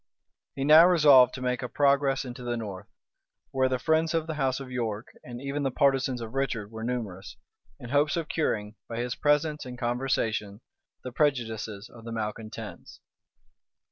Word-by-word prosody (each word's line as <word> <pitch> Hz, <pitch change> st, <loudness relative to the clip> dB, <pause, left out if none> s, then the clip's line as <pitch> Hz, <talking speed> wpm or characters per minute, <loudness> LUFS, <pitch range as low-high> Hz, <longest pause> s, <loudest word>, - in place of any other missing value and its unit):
He 135 Hz, -, -2 dB
now 155 Hz, +4 st, +8 dB
resolved 145 Hz, -8 st, +6 dB
to 130 Hz, -, -6 dB
make 125 Hz, -1 st, -1 dB
a 125 Hz, -, -4 dB
progress 140 Hz, -1 st, +2 dB
into 125 Hz, 0 st, -8 dB
the 120 Hz, -1 st, -2 dB
north, 100 Hz, -3 st, -7 dB, 0.6 s
where 130 Hz, -1 st, +2 dB
the 130 Hz, -, 0 dB
friends 160 Hz, +3 st, +1 dB
of 165 Hz, -1 st, 0 dB
the 160 Hz, -, -4 dB
house 135 Hz, -3 st, 0 dB
of 135 Hz, -2 st, -8 dB
York, 115 Hz, -3 st, -3 dB
and 120 Hz, -1 st, -8 dB
even 140 Hz, +2 st, -3 dB
the 135 Hz, -, +1 dB
partisans 135 Hz, -2 st, +1 dB
of 115 Hz, 0 st, -7 dB
Richard, 120 Hz, -6 st, -2 dB
were 110 Hz, 0 st, -7 dB
numerous, 100 Hz, -5 st, -4 dB, 0.4 s
in 125 Hz, -3 st, -9 dB
hopes 145 Hz, +3 st, +2 dB
of 165 Hz, -2 st, -2 dB
curing, 105 Hz, -11 st, -1 dB, 0.2 s
by 115 Hz, -, -5 dB
his 120 Hz, +1 st, -2 dB
presence 150 Hz, +2 st, +1 dB
and 125 Hz, -2 st, -8 dB
conversation, 120 Hz, -4 st, -1 dB, 0.4 s
the 125 Hz, -, -6 dB
prejudices 115 Hz, -7 st, -1 dB
of 120 Hz, -1 st, -15 dB
the 115 Hz, -, -7 dB
malecontents. 110 Hz, -1 st, -6 dB
125 Hz, 170 wpm, -27 LUFS, 115-140 Hz, 0.6 s, now